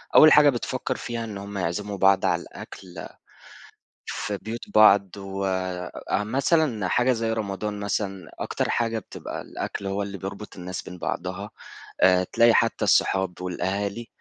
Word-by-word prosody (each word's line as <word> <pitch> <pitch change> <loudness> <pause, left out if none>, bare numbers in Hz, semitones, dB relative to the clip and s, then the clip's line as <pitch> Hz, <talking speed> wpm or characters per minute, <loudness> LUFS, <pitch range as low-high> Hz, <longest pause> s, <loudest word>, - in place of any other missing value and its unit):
أول 155 - +9
حاجة 150 -1 +7
بتفكِّر 130 0 -2
فيها 120 -1 -4
إن 110 -3 -6
هُم 100 +1 -7
يعزِّموا 100 +3 -2
بعض 95 0 +4
على - - +2
الأكل 90 -2 -10 1.0
في 105 -1 -3
بيوت 110 +4 -7
بعض. 100 -3 +6
وآآ 95 -1 -3
مثلًا 130 - +1
حاجة 125 +6 +3
زي 115 -1 -1
رمضان 105 -1 -3
مثلًا، 95 -3 -3
أكتر - - -2
حاجة 115 -1 0
بتبقى 100 - -7
الأكل 100 - -5
هو 100 +1 -1
اللي 100 0 -6
بيربط 100 +3 -7
الناس 90 0 -5
بين 90 - -9
بعضها. 95 +4 -4 0.5
آآ، 90 0 +5
تلاقي 115 +5 +4
حتى - - +2
الصحاب 95 -2 +2
والأهالي، 100 +5 -3
100 Hz, 145 wpm, -25 LUFS, 95-110 Hz, 1.0 s, أول